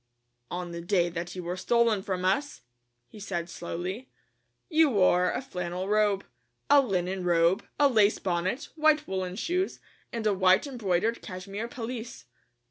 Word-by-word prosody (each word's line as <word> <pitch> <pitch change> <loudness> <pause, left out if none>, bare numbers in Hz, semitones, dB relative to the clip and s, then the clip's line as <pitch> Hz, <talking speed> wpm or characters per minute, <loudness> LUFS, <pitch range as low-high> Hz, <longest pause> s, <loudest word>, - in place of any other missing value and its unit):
"On 175 0 -4
the 170 0 -5
day 175 -1 +1
that 170 +1 -5
you 180 - -5
were 175 +1 -3
stolen 230 +1 +2
from 185 -1 -3
us," 280 +10 0 0.5
he 210 - -13
said 175 -4 -4
slowly, 180 +8 -5 0.6
"you 320 -3 +4
wore 185 -5 +3
a - - -3
flannel 180 -4 -4
robe, 210 -1 +2 0.5
a 285 -1 +8
linen 190 -5 -1
robe, 175 +3 +3 0.2
a 290 - +6
lace 215 -5 +4
bonnet, 185 +7 -2
white 310 -1 +3
woolen 185 -1 -3
shoes, 360 - -1 0.3
and 230 -3 -4
a 210 - +3
white 185 +2 +4
embroidered 230 -4 -1
cashmere 195 +4 -6
pelisse. 230 - -6
195 Hz, 150 wpm, -28 LUFS, 180-235 Hz, 0.6 s, a